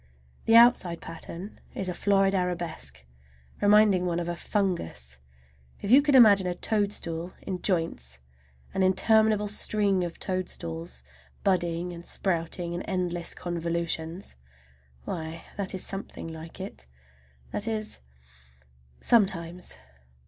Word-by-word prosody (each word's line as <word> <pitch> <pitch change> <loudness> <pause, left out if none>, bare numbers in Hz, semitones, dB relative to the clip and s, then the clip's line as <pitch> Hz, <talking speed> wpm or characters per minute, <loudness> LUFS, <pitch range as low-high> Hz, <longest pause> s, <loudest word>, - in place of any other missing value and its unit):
The 225 - +5
outside 230 -8 +6
pattern 170 +4 -8 0.2
is 190 - -3
a 180 - -1
florid 195 +1 +2
arabesque, 170 - -2 0.6
reminding 205 -3 +5
one 170 -1 0
of 170 - -3
a 175 - -2
fungus. 170 - -2 0.6
If 200 - -3
you 270 +3 +9
can 290 -1 +2
imagine 205 -7 +7
a 175 - -1
toadstool 185 -5 -2
in 185 -2 -4
joints, 115 - -2 0.5
an 190 - 0
interminable 215 +2 +4
string 205 -2 +1
of 170 -1 -5
toadstools, 85 - -4 0.4
budding 175 -2 0
and 170 0 -9
sprouting 170 -1 -2
in 175 - -3
endless 175 -3 -2
convolutions,—why, 160 - -5
that 195 -1 -1
is 185 - -2
something 195 -3 -4
like 160 +3 -10
it. 185 - -7 0.6
That 205 - -1
is, 215 -1 -3 1.0
sometimes! 180 - +1
180 Hz, 115 wpm, -27 LUFS, 165-200 Hz, 1.0 s, you